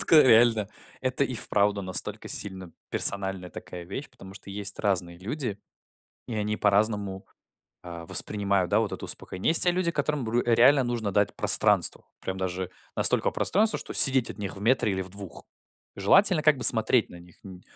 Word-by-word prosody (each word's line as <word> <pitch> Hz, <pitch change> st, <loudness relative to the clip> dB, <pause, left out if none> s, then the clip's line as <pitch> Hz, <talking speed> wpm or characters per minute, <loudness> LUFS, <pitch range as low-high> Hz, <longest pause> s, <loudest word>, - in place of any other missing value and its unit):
Жутко 160 Hz, -, +4 dB
реально, 115 Hz, -4 st, +3 dB, 0.3 s
это 130 Hz, +2 st, -2 dB
и 130 Hz, -, -6 dB
вправду 100 Hz, -2 st, -1 dB
настолько 95 Hz, -1 st, -5 dB
сильно 95 Hz, -3 st, -2 dB, 0.2 s
персональная 95 Hz, -2 st, 0 dB
такая 90 Hz, -1 st, -10 dB
вещь, 100 Hz, +11 st, -8 dB
потому 95 Hz, 0 st, -15 dB
что 100 Hz, 0 st, -12 dB
есть 100 Hz, 0 st, -2 dB
разные 90 Hz, -4 st, -2 dB
люди, 110 Hz, -, -6 dB, 0.7 s
и 120 Hz, -, -6 dB
они 105 Hz, 0 st, -3 dB
по-разному, 105 Hz, -2 st, -1 dB, 0.6 s
а, 85 Hz, -2 st, -10 dB
воспринимают, 100 Hz, -3 st, -1 dB
да, 105 Hz, -, +2 dB
вот 110 Hz, -, -4 dB
это -, -, -8 dB
успокоение. 95 Hz, -, -4 dB
Есть 165 Hz, -, +4 dB
те 180 Hz, -, +2 dB
люди, 180 Hz, -1 st, -2 dB
которым, 145 Hz, -3 st, -3 dB
бр 115 Hz, +2 st, -2 dB
реально 125 Hz, +4 st, +3 dB
нужно 120 Hz, -4 st, -4 dB
дать 100 Hz, +1 st, -1 dB
пространство. -, -, +3 dB, 0.2 s
Прям 95 Hz, 0 st, -6 dB
даже 95 Hz, -1 st, -5 dB, 0.3 s
настолько -, -, +2 dB
пространство, 215 Hz, +4 st, -1 dB
что -, -, -9 dB
сидеть 130 Hz, -3 st, +7 dB
от -, -, -11 dB
них 100 Hz, -1 st, -7 dB
в -, -, -11 dB
метре 115 Hz, -1 st, 0 dB
или 95 Hz, 0 st, -4 dB
в 95 Hz, -, -11 dB
2. 100 Hz, -1 st, -11 dB, 0.5 s
Желательно 165 Hz, -, +3 dB
как 150 Hz, -3 st, +2 dB
бы 125 Hz, -, -3 dB
смотреть 110 Hz, 0 st, +4 dB
на -, -, -13 dB
них 90 Hz, 0 st, -19 dB
н 95 Hz, -2 st, -13 dB
105 Hz, 180 wpm, -25 LUFS, 95-125 Hz, 0.7 s, сидеть